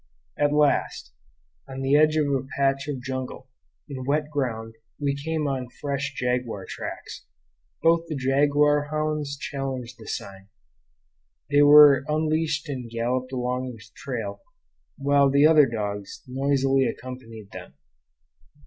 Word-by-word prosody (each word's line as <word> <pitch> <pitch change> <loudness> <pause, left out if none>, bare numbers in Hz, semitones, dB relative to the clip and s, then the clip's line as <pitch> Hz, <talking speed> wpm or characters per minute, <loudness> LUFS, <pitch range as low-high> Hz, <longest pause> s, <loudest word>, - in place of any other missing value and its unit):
At 145 0 +1
last, 145 - +1 0.6
on 135 0 -6
the 135 +2 +3
edge 155 +1 +4
of 155 - +2
a 135 -2 -1
patch 135 0 +1
of 135 -4 -4
jungle, 130 0 -5 0.4
in 135 -3 -6
wet 150 +3 -1
ground, 115 -6 -3 0.3
we 140 -1 0
came 155 +1 -2
on 130 -3 -3
fresh 140 -1 -3
jaguar 125 -5 -2
tracks. - - -7 0.6
Both 165 0 +3
the 155 - -4
jaguar 145 +2 +2
hounds 150 -2 -2
challenged 130 -4 -5
the 110 - -12
sign. 95 0 -6 1.0
They 145 0 +5
were 145 -2 +8
unleashed 155 0 0
and 130 -4 -5
galloped 125 +3 -2
along 125 0 -2
the 110 -2 -13
trail, 120 -5 -5 0.6
while 140 0 +3
the 140 +2 +4
other 155 -3 +6
dogs 105 -3 -5
noisily 135 0 +1
accompanied 115 -5 -7
them. - - -10
135 Hz, 130 wpm, -25 LUFS, 125-145 Hz, 1.0 s, were